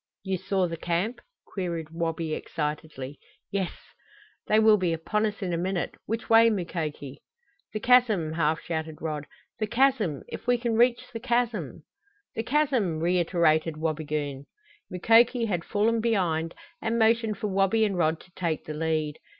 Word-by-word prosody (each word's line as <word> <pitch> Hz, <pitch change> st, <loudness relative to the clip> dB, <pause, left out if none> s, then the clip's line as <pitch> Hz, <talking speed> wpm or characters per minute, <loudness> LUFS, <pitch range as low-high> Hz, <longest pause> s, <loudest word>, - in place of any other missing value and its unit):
"You 190 Hz, -2 st, -2 dB
saw 190 Hz, -1 st, 0 dB
the 165 Hz, 0 st, -5 dB
camp?" 175 Hz, +9 st, -1 dB, 0.3 s
queried 170 Hz, -5 st, -4 dB
Wabi 165 Hz, -1 st, -2 dB
excitedly. 150 Hz, -3 st, -4 dB, 0.3 s
"Yes." 195 Hz, -3 st, -1 dB, 0.8 s
"They 215 Hz, -, +4 dB
will 220 Hz, -1 st, +6 dB
be 180 Hz, -3 st, 0 dB
upon 210 Hz, +7 st, 0 dB
us 210 Hz, 0 st, -5 dB
in 180 Hz, -2 st, -2 dB
a 170 Hz, -, 0 dB
minute! 185 Hz, 0 st, -1 dB
Which 225 Hz, +3 st, -3 dB
way, 230 Hz, 0 st, +7 dB
Mukoki?" 160 Hz, -8 st, -4 dB, 0.5 s
"The 215 Hz, -, -4 dB
chasm!" 220 Hz, -11 st, +4 dB
half 160 Hz, -1 st, +1 dB
shouted 160 Hz, -2 st, -4 dB
Rod. 150 Hz, -2 st, -4 dB, 0.3 s
"The 215 Hz, -, 0 dB
chasm! 230 Hz, -, +2 dB
If -, -, -8 dB
we 245 Hz, 0 st, +4 dB
can 235 Hz, -1 st, -1 dB
reach 240 Hz, +1 st, +2 dB
the 230 Hz, -, -4 dB
chasm 240 Hz, -2 st, -1 dB, 0.3 s
" 410 Hz, 0 st, -43 dB
"The -, -, -1 dB
chasm!" 245 Hz, -, +1 dB
reiterated 165 Hz, -2 st, +2 dB
Wabigoon. 150 Hz, -3 st, -3 dB, 0.4 s
Mukoki 230 Hz, +6 st, +4 dB
had 175 Hz, -6 st, -1 dB
fallen 225 Hz, +5 st, +1 dB
behind 175 Hz, -8 st, 0 dB, 0.3 s
and 225 Hz, +1 st, 0 dB
motioned 225 Hz, -1 st, +2 dB
for 210 Hz, -, -2 dB
Wabi 195 Hz, +3 st, +3 dB
and 200 Hz, -2 st, -1 dB
Rod 160 Hz, -2 st, +1 dB
to 180 Hz, -, -19 dB
take 170 Hz, -4 st, -2 dB
the 155 Hz, -, -5 dB
lead. 155 Hz, -1 st, -1 dB
180 Hz, 160 wpm, -27 LUFS, 160-225 Hz, 0.8 s, way